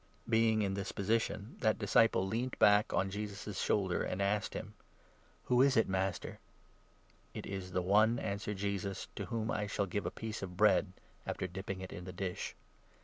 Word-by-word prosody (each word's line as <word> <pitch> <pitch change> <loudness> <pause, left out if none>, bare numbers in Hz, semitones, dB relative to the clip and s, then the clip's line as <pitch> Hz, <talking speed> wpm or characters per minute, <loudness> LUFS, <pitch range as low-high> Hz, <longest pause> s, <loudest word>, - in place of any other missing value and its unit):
Being 110 -1 +3
in 95 -1 0
this 100 0 -3
position, 110 +1 -1
that 110 -2 +2
disciple 105 -2 +3
leant 115 +6 -2
back 105 +1 +5
on 95 0 +1
Jesus' 105 0 -5
25 100 -3 -4
shoulder, 95 -3 +1
and 90 - -3
asked 100 +1 0
him: - - -6 0.7
"Who 125 0 +3
is 135 -2 +4
it, 115 - +4
Master?" 95 -1 -2 0.5
" - - -33
It - - -5
is 95 -2 -5
the 90 0 0
one," 105 +5 +4
answered 100 -1 -3
Jesus, 100 -1 -3
" - - -34
to - - -3
whom 115 -2 -2
I 105 -1 -1
shall 100 - 0
give 100 +2 -2
a - - +1
26 - - -15
piece 110 -1 -4
of 90 -2 -6
bread 105 -3 +4 0.3
after - - -2
dipping 95 +1 -5
it 95 - -7
in 90 - -7
the 90 - -6
dish." 90 -1 -4
100 Hz, 200 wpm, -34 LUFS, 95-110 Hz, 0.7 s, back